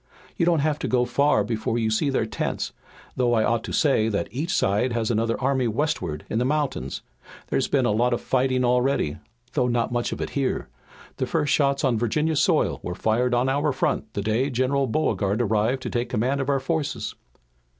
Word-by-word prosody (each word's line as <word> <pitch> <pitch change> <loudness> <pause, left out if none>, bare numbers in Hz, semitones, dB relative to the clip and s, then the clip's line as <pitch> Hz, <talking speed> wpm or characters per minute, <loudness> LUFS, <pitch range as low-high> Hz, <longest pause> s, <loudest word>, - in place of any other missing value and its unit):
"You 170 - +1
don't 165 -4 +3
have 150 0 0
to - - -2
go 125 -1 +2
far 140 -5 +2
before 110 +1 -2
you 110 -2 0
see 125 +7 +1
their 130 -5 +1
tents, 110 - -3 0.4
though 120 -2 +2
I 110 - +3
ought 115 0 +1
to - - -6
say 120 -7 +2
that 100 -5 -2
each 150 +8 -3
side 105 +6 +1
has 115 -1 0
another 115 0 0
army 130 -1 +1
westward 105 - -2
in 110 - -1
the - - +2
mountains. 135 - -2 0.5
There's - - +1
been - - +2
a - - +2
lot 120 +4 +2
of 120 - +1
fighting 130 -1 +1
already, 125 - +1 0.4
though 125 -4 +2
not 120 -1 0
much 120 -1 -1
of - - -4
it - - -4
here. 135 - -1 0.5
The - - -1
first 145 - +1
shots 140 -1 +2
on 125 -5 +2
Virginia 150 +8 0
soil 160 +2 +2
were 90 - -5
fired 120 +4 +1
on 125 +2 +2
our 145 +3 +1
front 130 - -1
the 100 - -2
day 110 +6 +1
General 130 +2 +1
Beauregard 110 -5 0
arrived 115 +3 +1
to - - -3
take 120 0 -1
command 125 +4 0
of 135 - -3
our 140 -1 +2
forces." 150 +2 -2
125 Hz, 205 wpm, -24 LUFS, 110-140 Hz, 0.5 s, don't